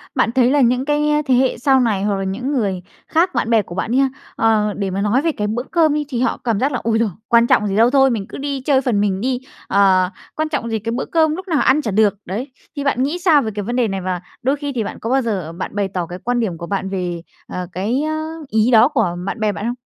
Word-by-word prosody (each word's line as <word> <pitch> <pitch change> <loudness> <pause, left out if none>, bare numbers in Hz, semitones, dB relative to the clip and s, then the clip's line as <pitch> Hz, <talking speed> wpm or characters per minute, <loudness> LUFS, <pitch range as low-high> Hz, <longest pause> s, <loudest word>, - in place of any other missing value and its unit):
bạn 225 - +2
thấy 250 0 +3
là 285 0 +3
những 250 +2 +2
cái 295 0 +1 0.3
thế 255 - +4
hệ 260 0 +2
sau 265 +2 +3
này 215 -6 +1
hoặc 205 -1 +1
là 195 - -3
những 245 +9 -3
người 200 -9 -1 0.3
khác, 340 +3 +1
bạn 225 - 0
bè 225 -2 +4
của 175 - -10
bạn 205 +4 -2
đi 255 - +2
ha, 270 -1 +3 0.3
ờ, 215 -2 +2
để 200 -1 -3
mà 190 +1 -2
nói 210 +7 +2
về 330 0 +1
cái 210 -6 -3
bữa 235 +3 -2
cơm 320 -3 +3
đi, 300 -1 -1
thì 245 -2 -2
họ 255 - 0
cảm 225 -4 0
giác 275 +3 +1
là 250 - -1
"Ôi 225 0 +1
giời, 225 -2 +1 0.2
quan 235 0 +4
trọng 210 - +3
gì 195 - -2
đâu, 230 +3 +5
thôi 270 0 +4
mình 220 -5 -2
cứ - - -8
đi 275 -1 -3
chơi 265 -1 +2
phần 235 -6 0
mình 195 -1 0
đi, 255 0 -1 0.3
ờ, 190 -2 +3 0.3
quan 310 0 -1
trọng 235 -6 -2
gì 220 -1 -1
cái 230 +2 -4
bữa 240 - -2
cơm 315 -2 +2
lúc 375 +2 -8
nào 320 -4 +1
ăn 295 +4 +3
chả 220 - -3
được." 210 0 +3
Đấy, 230 +9 -5 0.2
thì 285 - -3
bạn 260 -2 +1
nghĩ 295 +6 -1
sao 330 -5 +4
về 220 - -3
cái 205 - -3
vấn 240 +5 -3
đề 245 -3 +2
này 195 -1 -3
và 180 -1 -3 0.2
đôi 265 +3 +1
khi 285 -1 -4
thì 225 - 0
bạn - - -6
có 225 - -4
bao 265 +1 +3
giờ 195 -9 -3
bạn 185 +3 -6
bày 200 -1 0
tỏ 180 -2 -3
cái 180 +2 -8
quan 245 0 0
điểm 190 -8 -2
của 170 0 -7
bạn 195 -1 -2
về, 180 -3 -3 0.3
ờ, 180 -1 -5
cái, 215 +9 -1
a, 310 0 -2 0.2
ý 220 +2 +2
đó 230 +2 +7
của 225 - 0
bạn 195 - -4
bè 215 -1 +1
bạn 205 - -5
không? 240 - -1
230 Hz, 295 wpm, -19 LUFS, 200-270 Hz, 0.3 s, đó